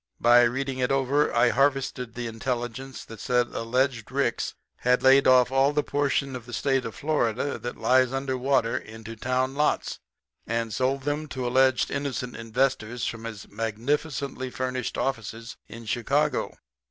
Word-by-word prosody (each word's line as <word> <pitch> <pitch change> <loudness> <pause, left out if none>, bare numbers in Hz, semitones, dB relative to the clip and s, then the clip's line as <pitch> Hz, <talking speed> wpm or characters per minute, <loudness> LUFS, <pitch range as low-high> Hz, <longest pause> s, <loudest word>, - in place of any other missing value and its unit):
By 120 +1 +6
reading 130 +2 -2
it 125 0 +1
over 135 +2 +2
I 125 - +4
harvested 135 -3 0
the 120 0 -4
intelligence 120 +2 -4
that 115 -2 -11
said 125 0 +1
alleged 125 0 -1
Ricks 135 -3 -1 0.2
had 125 0 +2
laid 135 +1 +6
off 130 -1 +5
all 135 +2 +3
that 150 0 +1
portion 140 -1 0
of 120 -1 -8
the 120 - -9
State 135 +2 +1
of 115 - -6
Florida 140 -3 -1
that 120 - -6
lies 130 -1 +3
under 135 0 -2
water 130 -2 +1
into 110 -2 -7
town 130 +3 -1
lots 150 +2 0 0.5
and 115 -1 -1
sold 130 +5 -1
'em 150 +1 -1
to 130 -3 -4
alleged 130 0 +3
innocent 135 -3 -3
investors 120 0 -1
from 115 0 -4
his 110 -4 -7
magnificently 130 +5 -2
furnished 130 -1 -3
offices 115 -3 -3
in 115 0 -10
Chicago. 135 +6 0
130 Hz, 155 wpm, -26 LUFS, 115-135 Hz, 0.5 s, By